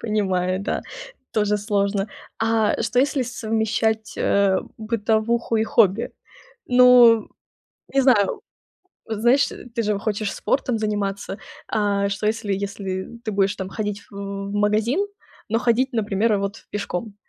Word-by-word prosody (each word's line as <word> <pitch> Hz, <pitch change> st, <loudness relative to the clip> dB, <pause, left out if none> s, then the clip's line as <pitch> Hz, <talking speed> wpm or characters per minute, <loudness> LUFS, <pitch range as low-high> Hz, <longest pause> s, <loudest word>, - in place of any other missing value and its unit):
Понимаю, 190 Hz, -4 st, 0 dB
да. 200 Hz, -, -2 dB, 0.5 s
Тоже 210 Hz, -1 st, +2 dB
сложно. 200 Hz, 0 st, 0 dB, 0.3 s
А 225 Hz, -1 st, +1 dB
что, 230 Hz, +2 st, 0 dB
если 275 Hz, 0 st, +1 dB
совмещать, 220 Hz, -2 st, -1 dB
э, 200 Hz, -1 st, +3 dB, 0.2 s
бытовуху 225 Hz, +1 st, 0 dB
и 220 Hz, -, +2 dB
хобби? 220 Hz, 0 st, +2 dB, 0.5 s
Ну, 245 Hz, -3 st, +6 dB, 0.7 s
не 275 Hz, -, +4 dB
знаю, 240 Hz, -7 st, +3 dB, 0.7 s
знаешь, 240 Hz, +6 st, +3 dB, 0.3 s
ты 230 Hz, -, 0 dB
же 210 Hz, -2 st, 0 dB
хочешь 210 Hz, 0 st, -2 dB
спортом 250 Hz, -4 st, 0 dB
заниматься. 200 Hz, -2 st, -2 dB, 0.3 s
А 200 Hz, -2 st, +1 dB
что, 200 Hz, +2 st, -2 dB
если 215 Hz, -1 st, -1 dB
если 195 Hz, -1 st, -4 dB, 0.2 s
ты 215 Hz, -, -2 dB
будешь 195 Hz, 0 st, +1 dB
там 190 Hz, -1 st, -5 dB
ходить 210 Hz, 0 st, -4 dB
в -, -, -15 dB, 0.4 s
магазин, 210 Hz, -, +1 dB, 0.5 s
но 225 Hz, +1 st, +1 dB
ходить, 245 Hz, +3 st, +1 dB
например, 210 Hz, -1 st, +1 dB
вот 200 Hz, +2 st, -5 dB
пешком? 205 Hz, +1 st, -4 dB
215 Hz, 125 wpm, -22 LUFS, 200-230 Hz, 0.7 s, Ну